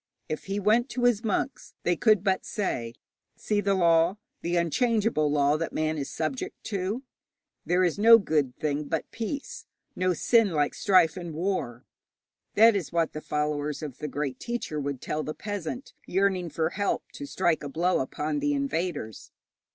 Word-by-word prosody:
If 155 Hz, -, -4 dB
he 195 Hz, +1 st, -2 dB
went 225 Hz, +6 st, +3 dB
to 250 Hz, -, -3 dB
his 240 Hz, -3 st, +3 dB
monks, 225 Hz, +4 st, -2 dB
they 175 Hz, -, +2 dB
could 215 Hz, 0 st, +3 dB
but 190 Hz, -2 st, +1 dB
say: 120 Hz, -, -3 dB, 0.4 s
'See 210 Hz, -1 st, -1 dB
the 200 Hz, -1 st, +2 dB
law, 170 Hz, +1 st, +4 dB, 0.2 s
the 175 Hz, +1 st, -1 dB
unchangeable 200 Hz, -, +1 dB
law 145 Hz, 0 st, +3 dB
that 165 Hz, +1 st, -3 dB
man 155 Hz, 0 st, -1 dB
is 140 Hz, -, -4 dB
subject 260 Hz, -, -3 dB, 0.2 s
to. 200 Hz, +6 st, -2 dB, 0.6 s
There 180 Hz, +1 st, +3 dB
is 180 Hz, +2 st, +1 dB
no 230 Hz, +2 st, +9 dB
good 150 Hz, -, 0 dB
thing 150 Hz, 0 st, -1 dB
but 160 Hz, +1 st, -3 dB
peace, 245 Hz, +5 st, -5 dB, 0.3 s
no 185 Hz, -1 st, +1 dB
sin 225 Hz, 0 st, +3 dB
like 145 Hz, -2 st, +1 dB
strife 185 Hz, -4 st, +3 dB
and 175 Hz, -3 st, -6 dB
war.' 155 Hz, -9 st, -2 dB, 0.7 s
That 225 Hz, +1 st, +7 dB
is 190 Hz, -6 st, -2 dB
what 165 Hz, -1 st, 0 dB
the 155 Hz, -, -5 dB
followers 150 Hz, 0 st, -2 dB
of 140 Hz, -4 st, -7 dB
the 150 Hz, -, -3 dB
great 140 Hz, -2 st, -3 dB
teacher 235 Hz, -10 st, -3 dB
would 140 Hz, -2 st, -3 dB
tell 155 Hz, -, -2 dB
the 155 Hz, 0 st, -5 dB
peasant 205 Hz, -, -5 dB
yearning 190 Hz, -2 st, +1 dB
for 160 Hz, +2 st, -1 dB
help 200 Hz, 0 st, -1 dB
to 285 Hz, -, -7 dB
strike 175 Hz, -, +1 dB
a 145 Hz, -, -4 dB
blow 175 Hz, +6 st, +1 dB
upon 150 Hz, -, -2 dB
the 290 Hz, 0 st, +1 dB
invaders. 175 Hz, -, -3 dB
175 Hz, 175 wpm, -27 LUFS, 150-205 Hz, 0.7 s, no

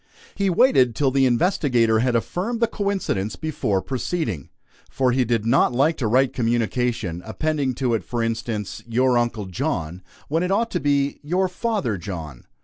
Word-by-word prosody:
He 200 Hz, -1 st, 0 dB
waited 170 Hz, -, +4 dB
till 135 Hz, 0 st, +2 dB
the 135 Hz, 0 st, +3 dB
investigator 120 Hz, -, +2 dB
had 125 Hz, +1 st, +1 dB
affirmed 190 Hz, -, -1 dB
the 230 Hz, -, +4 dB
coincidence, 200 Hz, -, -2 dB
before 120 Hz, -11 st, -1 dB
proceeding; 125 Hz, -, -3 dB, 0.4 s
for 130 Hz, -2 st, +1 dB
he 130 Hz, +1 st, +2 dB
did 115 Hz, -2 st, 0 dB
not 125 Hz, +1 st, +3 dB
like 145 Hz, +6 st, +2 dB
to 120 Hz, -, -1 dB
write 130 Hz, +4 st, +3 dB
a -, -, -24 dB
communication, 115 Hz, -5 st, -1 dB
appending 135 Hz, +4 st, -1 dB
to 125 Hz, -2 st, 0 dB
it, 115 Hz, -, 0 dB
for 120 Hz, -1 st, -2 dB
instance, 115 Hz, -2 st, -3 dB
"Your 125 Hz, +2 st, +2 dB
Uncle 120 Hz, -3 st, 0 dB
John," 90 Hz, -, -3 dB, 0.3 s
when 160 Hz, +3 st, 0 dB
it 180 Hz, -, -1 dB
ought 230 Hz, +4 st, +1 dB
to -, -, 0 dB
be 140 Hz, 0 st, +1 dB
"Your 180 Hz, +6 st, 0 dB
Father 185 Hz, -, -2 dB
John." 80 Hz, -8 st, -7 dB
125 Hz, 170 wpm, -23 LUFS, 110-155 Hz, 0.4 s, waited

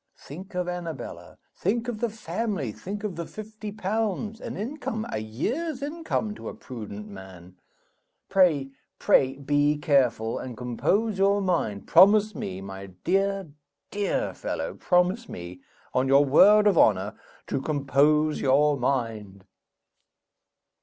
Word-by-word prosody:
Think 180 Hz, +7 st, -11 dB
of 180 Hz, -1 st, -1 dB
Annabella, 175 Hz, -4 st, -6 dB, 0.2 s
think 230 Hz, +6 st, -1 dB
of 235 Hz, -3 st, -3 dB
the 235 Hz, -, 0 dB
family, 210 Hz, -, -3 dB
think 200 Hz, -, -7 dB
of 205 Hz, -5 st, -3 dB
the 170 Hz, -, -4 dB
fifty 215 Hz, 0 st, -8 dB
pounds 215 Hz, +1 st, -2 dB
an -, -, -6 dB
income, 225 Hz, -1 st, -4 dB
a -, -, -2 dB
year's 255 Hz, -, -3 dB
income 295 Hz, -8 st, -2 dB
to -, -, -7 dB
a -, -, -8 dB
prudent 110 Hz, -, -8 dB
man. 95 Hz, -3 st, -12 dB, 0.7 s
Pray, 165 Hz, -9 st, +3 dB, 0.3 s
pray 135 Hz, 0 st, +3 dB
be 145 Hz, +1 st, +1 dB
careful, 130 Hz, -7 st, +1 dB
and 125 Hz, -3 st, -7 dB
compose 190 Hz, -, 0 dB
your 200 Hz, +1 st, +4 dB
mind: 170 Hz, -, -1 dB
promise 210 Hz, +2 st, +6 dB
me, 95 Hz, -, -5 dB
my 95 Hz, 0 st, -8 dB, 0.2 s
dear, 195 Hz, -1 st, 0 dB, 0.4 s
dear 205 Hz, -1 st, -1 dB
fellow -, -, -4 dB
promise 180 Hz, +6 st, +1 dB
me, 90 Hz, +1 st, -8 dB, 0.3 s
on 130 Hz, +1 st, +2 dB
your 140 Hz, +2 st, +5 dB
word 205 Hz, +10 st, +6 dB
of 200 Hz, -5 st, +4 dB
honor, 100 Hz, -1 st, +3 dB, 0.3 s
to 135 Hz, -, -2 dB
compose 150 Hz, +2 st, +2 dB
your 145 Hz, +2 st, +3 dB
mind!" 115 Hz, -7 st, -2 dB
165 Hz, 135 wpm, -26 LUFS, 125-210 Hz, 0.7 s, promise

